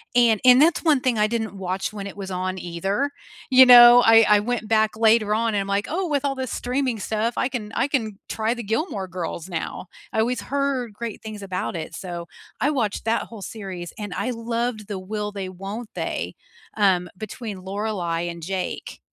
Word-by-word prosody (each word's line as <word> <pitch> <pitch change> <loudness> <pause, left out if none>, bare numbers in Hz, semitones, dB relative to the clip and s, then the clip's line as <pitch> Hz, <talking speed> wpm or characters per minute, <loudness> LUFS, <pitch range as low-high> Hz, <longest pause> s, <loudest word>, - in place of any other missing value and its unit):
and 235 -3 +5
and 250 +2 +8
that's 335 +2 +3
one 305 -5 +4
thing 245 -4 +1
I 210 - +4
didn't 220 -3 -3
watch 190 +2 -3
when 200 -2 -6
it 200 - -7
was 195 -1 -6
on 185 0 -3
either, 195 +11 -2 0.4
you 260 0 +8
know, 245 0 +10
I 225 0 +8
I 210 -1 +6
went 230 -1 -2
back 220 -1 +2
later 220 -1 +3
on, 225 -1 +1
I'm, 195 -1 0
like, 200 +1 0
"Oh, 360 +3 -1
with 290 -2 0
all 275 -1 0
this 260 -2 -4
streaming 250 -2 -1
stuff, 220 +3 -1
I 255 - +1
can 220 -5 -5
I - - +1
can 220 -8 -2
try 220 +1 0
the 240 - -6
Gilmore 220 - -2
Girls 180 -1 -5
now, 175 +1 -5 0.2
I - - -1
always 235 +1 0
heard 270 -3 -2
great 230 0 -6
things 215 -1 -7
about 190 0 -3
it," 160 -2 -6
so 175 -2 -6 0.3
I 285 - +3
watched 230 -8 -1
that 225 +1 +1
whole 225 -3 -11
series, 190 -4 -7
and 205 -4 -5
I 255 - -2
loved 230 -2 -3
the 200 -3 -4
will-they, 205 -1 -4
won't-they, 200 +5 -5 0.4
um, 185 -4 +3
between 215 -1 -6
Lorelei 190 -4 -2
and 170 -1 -5
Jake. 190 +1 -4
215 Hz, 195 wpm, -23 LUFS, 195-240 Hz, 0.4 s, know